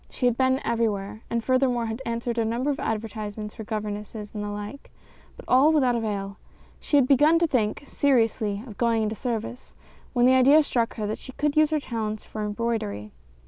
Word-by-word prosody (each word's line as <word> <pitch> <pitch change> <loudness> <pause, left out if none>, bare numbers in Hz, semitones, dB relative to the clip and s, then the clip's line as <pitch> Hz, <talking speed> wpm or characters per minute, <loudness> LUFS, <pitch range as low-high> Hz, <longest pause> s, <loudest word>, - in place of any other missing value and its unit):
She 250 - -3
had 245 -2 +3
been 260 +1 +2
everywhere, 215 -2 -1
and 235 -1 -1
furthermore, 255 -2 +2
had 225 +3 -4
answered 235 0 -2
a - - +2
number 240 +6 0
of 280 - -4
advertisements 215 -1 -4
for 220 - -8
governesses 210 0 -5
and 210 -1 -4
the 205 - -4
like, 205 +6 -7 0.5
but - - -12
all 265 +5 +5
without 260 -6 +3
avail. 200 -3 -3 0.4
She 290 - +1
had 265 -3 +4
begun 295 +5 +5
to 335 - +3
think, 240 -6 0
seriously, 225 -7 +1
of 220 -6 -12
going 230 -2 +2
into 215 0 -1
service, 235 +2 -5 0.4
when 245 -2 +3
the 255 - +6
idea 275 +4 +6
struck 235 -5 -1
her 215 - -3
that 210 +1 -3
she 260 - -10
could 295 +2 -1
use 310 -1 +5
her 310 -1 +1
talents 220 -5 -4
for 215 - -5
embroidery. 205 - -3
230 Hz, 195 wpm, -25 LUFS, 210-260 Hz, 0.5 s, the